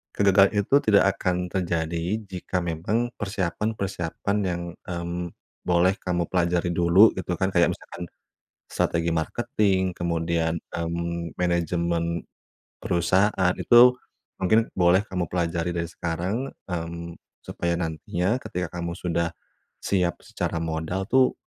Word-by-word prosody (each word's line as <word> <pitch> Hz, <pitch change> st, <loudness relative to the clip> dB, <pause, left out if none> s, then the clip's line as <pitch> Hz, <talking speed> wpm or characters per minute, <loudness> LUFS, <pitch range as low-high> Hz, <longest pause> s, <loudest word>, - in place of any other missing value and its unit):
kegagalan 100 Hz, 0 st, +5 dB
itu 100 Hz, +7 st, +2 dB
tidak 100 Hz, -2 st, +5 dB, 0.2 s
akan 90 Hz, -1 st, -1 dB
terjadi, 85 Hz, +1 st, -1 dB
jika 90 Hz, -1 st, -3 dB
memang 90 Hz, +9 st, -1 dB
persiapan-persiapan 100 Hz, -1 st, -2 dB
yang, 85 Hz, -1 st, -2 dB, 0.3 s
mmm, 85 Hz, 0 st, -3 dB, 0.4 s
boleh 90 Hz, +2 st, +3 dB
kamu 90 Hz, -1 st, 0 dB
pelajari 90 Hz, -1 st, +1 dB
dulu 90 Hz, +6 st, +6 dB
gitu 90 Hz, -1 st, -2 dB
kan, 95 Hz, -, +2 dB
kayak 85 Hz, -1 st, +4 dB
misalkan 90 Hz, -, -9 dB, 0.7 s
strategi 85 Hz, 0 st, 0 dB
marketing, 95 Hz, +1 st, 0 dB
kemudian, 85 Hz, -1 st, 0 dB, 0.2 s
mmm, 85 Hz, 0 st, -3 dB
manajemen 85 Hz, -1 st, 0 dB, 0.6 s
perusahaan 95 Hz, +2 st, +2 dB
itu 120 Hz, +1 st, +7 dB, 0.5 s
mungkin 110 Hz, +5 st, +3 dB
boleh 90 Hz, +2 st, +4 dB
kamu 90 Hz, -2 st, -2 dB
pelajari 85 Hz, -1 st, -1 dB
dari 85 Hz, 0 st, -1 dB
sekarang, 90 Hz, +10 st, -3 dB, 0.2 s
mmm, 85 Hz, -1 st, -5 dB, 0.3 s
supaya 85 Hz, 0 st, -2 dB
nantinya 90 Hz, +6 st, -1 dB
ketika 90 Hz, 0 st, -3 dB
kamu 85 Hz, 0 st, -3 dB
sudah 85 Hz, -1 st, -1 dB, 0.5 s
siap 90 Hz, -3 st, 0 dB
secara -, -, -3 dB
modal 80 Hz, +4 st, -2 dB
tuh, 130 Hz, -1 st, +4 dB
90 Hz, 115 wpm, -25 LUFS, 85-95 Hz, 0.7 s, itu